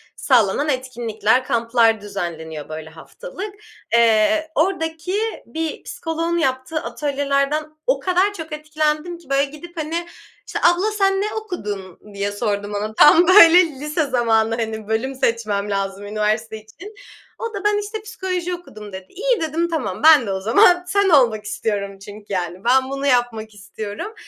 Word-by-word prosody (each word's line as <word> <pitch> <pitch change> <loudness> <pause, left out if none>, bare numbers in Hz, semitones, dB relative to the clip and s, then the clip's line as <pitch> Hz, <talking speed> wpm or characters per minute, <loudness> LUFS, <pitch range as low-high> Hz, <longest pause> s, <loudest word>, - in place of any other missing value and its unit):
sağlanan 250 +3 +2
etkinlikler, 245 -3 0
kamplar 230 -2 +2
düzenleniyor, 160 -7 -6
böyle, 155 0 -7
haftalık, 395 - -9 0.4
eee. 235 +8 +3
Ordaki 325 +1 -1 0.3
bir 320 -1 -5
psikoloğun 330 +1 -3
yaptığı 265 +1 -1
atölyelerden 285 +1 -1 0.2
o - - +2
kadar 375 +2 +1
çok 320 -4 -8
etkilendim 305 +2 -2
ki, 325 -5 -20
böyle, 275 +1 +2
gidip, 305 +5 -12
hani, 330 +2 -3 0.4
işte, - - -3
"Abla 355 +5 +3
sen 390 -2 +1
ne 425 +1 -2
okudun?" 210 - -6
diye 200 0 -2
sordum 205 -1 -3
ona. 215 +1 -3
Tam, 330 +8 +6
böyle, 360 -2 +8
lise 300 +1 -3
zamanı, 225 -3 +2
hani, 220 -2 -4
bölüm 235 +5 -1
seçmem 215 -5 -1
lazım 195 0 -3
üniversite 215 +2 -1
için. 220 - -13 0.4
O 460 -1 -4
da, 395 - -5
"Ben 415 0 +2
işte 420 +1 -4
psikoloji 365 -4 -4
okudum." 215 - -10
dedi. 190 0 -8
İyi, 470 +1 0
dedim, 320 +2 -1
tamam, 265 - -3
"Ben 300 -8 +7
de - - -1
o 190 - -2
zaman 355 - +5
sen 400 +1 +2
olmak 235 -9 +3
istiyorum." 205 -2 -3
çünkü, 205 +1 -11
yani. 180 0 -3
Ben 260 +2 +3
bunu 275 +1 -3
yapmak 240 -4 0
istiyorum 205 - -7
265 Hz, 150 wpm, -20 LUFS, 215-340 Hz, 0.4 s, böyle